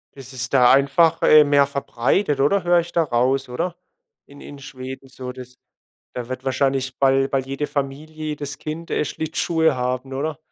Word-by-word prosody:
Das 135 -1 -12
ist 125 +1 -5
da 125 -2 +6
einfach, 140 +5 +3
äh, 155 0 +7
mehr 145 -1 +3
verbreitet, 140 - -1
oder, 185 +8 +2
höre 175 0 +4
ich 170 0 -4
da 170 - +2
raus, 130 0 0
oder? 170 +8 -3 0.5
In 140 0 -15
in 145 - -10
Schweden 130 0 -9
so, 130 -1 -8
das 125 0 -11 0.6
da 120 -1 -6
wird 130 0 -6
wahrscheinlich 135 0 -1
bei 135 0 +3
bei 135 - 0
jeder 135 +2 -3
Familie, 145 +2 -4
jedes 145 -2 -5
Kind, 160 +2 -7
äh, - - 0
Schlittschuhe 160 0 0
haben, 125 +1 -3
oder? 150 +2 -3
135 Hz, 175 wpm, -21 LUFS, 130-150 Hz, 0.6 s, äh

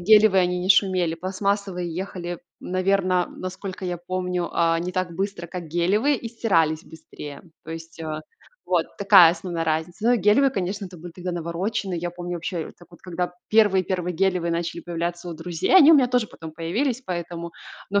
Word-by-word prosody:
гелевые 210 0 +6
они 180 0 0
не 180 +1 -3
шумели. 185 -4 +3
Пластмассовые 185 -1 -2
ехали, 175 -1 -5 0.2
наверно, 185 -1 +1
насколько 185 +1 -6
я 175 -1 -2
помню, 180 0 -2
а, 165 -1 +2
не 180 +2 -3
так 185 -2 -1
быстро, 195 -2 -3
как 180 0 -6
гелевые 195 - +2
и 230 - -6
стирались 165 -9 +1
быстрее. 150 -2 -10 0.2
То 160 - -9
есть, 165 0 -8
э, 155 -1 -4 0.5
вот 175 -3 +2
такая 195 -4 +8
основная 175 -3 -4
разница. 160 +6 -2
Но 245 - +6
и - - +3
гелевые, 220 +7 +4
конечно, 195 -2 -3
это 180 -1 -12
были 170 +1 -10
тогда 180 0 -5
навороченные. 175 +2 -2
Я 175 +1 -3
помню 175 0 -6
вообще 170 -1 -4
так 175 - -17
вот, 170 - -16
когда 180 -1 -3 0.2
первые-первые 190 -4 +2
гелевые 180 -3 +1
начали 170 0 -2
появляться 175 +1 -4
у 170 - -5
друзей, 170 - -1
они 320 -2 +9
у - - +9
меня 265 -4 +5
тоже 245 -3 +1
потом 160 -4 -10
появились 225 - -1
поэтому. 170 -1 -5 0.4
Но 200 - +3
180 Hz, 180 wpm, -24 LUFS, 170-195 Hz, 0.5 s, они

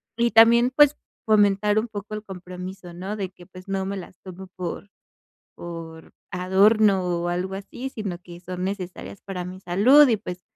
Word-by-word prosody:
y 235 0 +1
también, 235 +3 +6
pues, 295 0 +6 0.3
fomentar 210 -1 +3
un 230 - -3
poco 215 0 -7
el 215 - -6
compromiso, 180 -1 -9
¿no? 190 +4 -5
De 195 -3 -4
que, 180 -1 -17
pues, 185 +1 -14
no 190 -1 -1
me 200 +1 -3
las 185 -1 -10
tomo 190 0 -10
por 180 +3 -5 0.6
por 165 -1 -9 0.2
adorno 195 +2 +3
o 175 -1 -1
algo 180 +2 -2
así, 220 +7 -7
sino 210 -8 -5
que 175 -1 -12
son 180 0 -6
necesarias 190 0 -6
para 185 -2 -5
mi 185 +1 -8
salud, 235 +12 +6
y 230 - +3
pues, 180 -4 -8
190 Hz, 175 wpm, -24 LUFS, 180-215 Hz, 0.6 s, también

